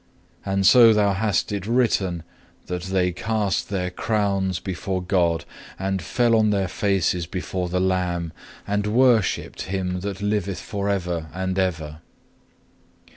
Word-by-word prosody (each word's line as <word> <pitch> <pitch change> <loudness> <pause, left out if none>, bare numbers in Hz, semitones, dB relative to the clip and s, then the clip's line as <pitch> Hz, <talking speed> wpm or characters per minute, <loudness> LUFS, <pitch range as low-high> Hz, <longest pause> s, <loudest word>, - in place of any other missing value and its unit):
And 95 -1 0
so 115 +1 +8
thou 100 -2 +3
hast 100 0 0
it 100 -1 -3
written 100 -8 +1 0.4
that 90 0 -4
they 95 -1 +1
cast 105 +2 -1
their 90 -2 -2
crowns 100 -3 0
before 95 0 -3
God 85 -3 +1 0.3
and 95 0 -2
fell 120 +6 +2
on 110 -1 +3
their 100 -2 +1
faces 90 -2 0
before 90 0 -3
the 90 +1 0
Lamb, 90 -3 -1 0.3
and 105 0 -1
worshipped 120 -2 +2
Him 90 -1 -2
that 100 0 -5
liveth 100 -2 -1
for 100 -1 -3
ever 90 -5 -2
and 95 0 -2
ever. 80 -4 -2
95 Hz, 135 wpm, -23 LUFS, 90-105 Hz, 0.4 s, so